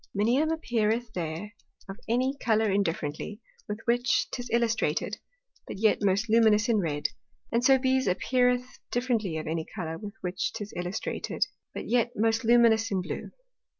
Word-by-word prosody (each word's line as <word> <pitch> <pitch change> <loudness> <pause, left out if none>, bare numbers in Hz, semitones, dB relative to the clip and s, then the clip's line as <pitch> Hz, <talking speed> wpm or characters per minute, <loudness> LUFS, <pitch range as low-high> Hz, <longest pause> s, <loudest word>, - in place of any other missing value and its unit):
Minium 250 +10 +2
appeareth 235 -6 0
there 170 +5 -4 0.3
of 195 +3 -8
any 255 +4 +1
Colour 220 -2 +2
indifferently, 175 0 -2 0.3
with 210 +1 -5
which 240 -1 +2
'tis 245 -1 -5
illustrated, 225 -4 0 0.5
but - - -6
yet 215 +1 +3
most 200 +2 +2
luminous 220 -1 +4
in 230 -2 +3
red; 145 -5 -1 0.4
and 235 +1 +1
so 270 +1 +6
Bise 260 -1 +1
appeareth 250 +6 +1
indifferently 230 -9 0
of 155 - -4
any 160 0 -2
Colour 165 -5 -4
with 210 0 -8
which 180 +1 -2
'tis 210 -2 -6
illustrated, 180 +4 -2 0.3
but - - -5
yet 240 0 +2
most 225 +1 +1
luminous 230 -1 +5
in 190 -2 -1
blue. - - -5
220 Hz, 150 wpm, -28 LUFS, 195-240 Hz, 0.5 s, so